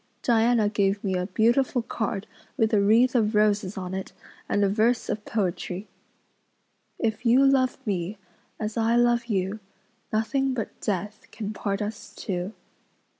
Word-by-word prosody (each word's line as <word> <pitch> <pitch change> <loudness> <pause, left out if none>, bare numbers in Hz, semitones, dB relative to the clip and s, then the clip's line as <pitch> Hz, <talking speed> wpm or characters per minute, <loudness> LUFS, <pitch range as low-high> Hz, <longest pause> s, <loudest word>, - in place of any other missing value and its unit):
Diana 230 -2 +3
gave 200 -1 +1
me 195 -2 0
a 180 0 -1
beautiful 235 +5 +2
card 220 -3 -3 0.3
with 220 0 +2
a 205 - +5
wreath 230 +5 +4
of 220 -3 +2
roses 210 -2 +2
on 185 -1 -4
it 190 0 -5 0.4
and 205 - +2
a - - +4
verse 225 +4 +1
of 210 - -2
poetry:" 190 -1 -2 1.1
"If 220 -1 -1
you 250 +3 +5
love 265 -2 +3
me 195 -1 -2 0.4
as 215 +1 -3
I 230 +1 +2
love 240 -1 +3
you 195 -1 -1 0.5
Nothing 260 +5 0
but 225 - -5
death 205 +1 -3
can 215 -1 -5
part 200 0 -2
us 210 0 -7
two." 185 +2 -4
215 Hz, 150 wpm, -26 LUFS, 200-235 Hz, 1.1 s, a